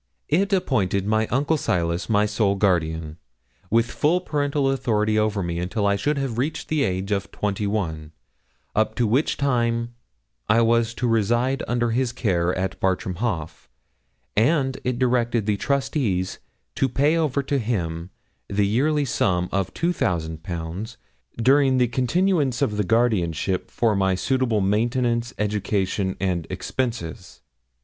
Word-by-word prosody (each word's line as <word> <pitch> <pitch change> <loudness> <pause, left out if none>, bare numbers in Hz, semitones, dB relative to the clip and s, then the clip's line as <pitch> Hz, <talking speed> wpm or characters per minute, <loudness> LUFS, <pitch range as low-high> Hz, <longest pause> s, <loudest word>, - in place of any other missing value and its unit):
It 190 +7 +2
appointed 100 - +1
my 110 +1 +1
uncle 145 +5 +1
Silas 85 - -1
my 105 -1 +3
sole 105 -1 +1
guardian, 80 -5 0 0.5
with 115 +3 +2
full 165 +5 +2
parental 145 -4 0
authority 110 -5 +1
over 105 -2 0
me 85 0 -3
until 95 +4 -1
I 100 0 +3
should 145 +9 0
have 130 -4 -2
reached 150 +5 -2
the 155 -2 +1
age 95 -4 -1
of 100 -1 -1
twenty 105 0 -2
one, 80 -7 -3 0.6
up 110 +1 +1
to 120 - +1
which 125 +8 +1
time 120 -3 0 0.6
I 110 +2 +5
was 115 0 +2
to 125 - -1
reside 120 +4 +1
under 120 -1 0
his 120 +1 0
care 90 -8 +1
at 95 0 -2
Bartram 95 -1 -1
Haugh, 100 -8 -3 0.7
and 135 +3 +2
it 125 -1 -1
directed 120 -3 +1
the 105 -1 +1
trustees 130 - -1 0.3
to 135 - +1
pay 145 +6 +2
over 145 -4 0
to 140 0 0
him 85 -7 -2 0.4
yearly 120 +10 +2
a - - -2
sum 90 -7 0
of 100 -2 -1
2,000_l_. 85 - -2 0.4
during 135 +2 +4
the 125 -1 +3
continuance 135 +1 +1
of 105 - -1
the 105 - +2
guardianship 95 -5 +1
for 115 -3 +1
my 95 -1 +2
suitable 120 +2 +1
maintenance, 115 +4 0
education, 100 -2 -1
and 90 -4 -1
expenses. 115 -11 -4
110 Hz, 140 wpm, -23 LUFS, 95-130 Hz, 0.7 s, I